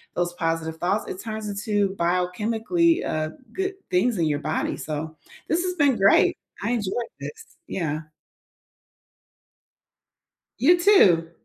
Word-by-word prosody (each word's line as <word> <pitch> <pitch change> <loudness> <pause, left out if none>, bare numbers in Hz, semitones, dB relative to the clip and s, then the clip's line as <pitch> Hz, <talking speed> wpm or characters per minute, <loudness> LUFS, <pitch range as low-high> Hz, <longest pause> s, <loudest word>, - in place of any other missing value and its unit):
those 175 0 -1
positive 165 -2 -2
thoughts. 195 +4 0
It 185 - -6
turns 220 -1 -5
into 200 -1 -1
biochemically, 220 - +1
uh, 155 0 -1 0.2
good 385 0 -2 0.2
things 210 +5 +2
in 170 - +1
your 145 -2 0
body, 155 +1 -2
so 155 +1 -5 0.3
this 335 +3 +1
has 365 0 -1
been 285 -7 +3
great. 195 0 +5 0.3
I 220 - 0
enjoyed 235 0 -2
this, 450 -1 -10
yeah. 155 -4 -2 2.6
You 340 +7 +6
too! 200 - +5
200 Hz, 125 wpm, -24 LUFS, 165-250 Hz, 2.6 s, You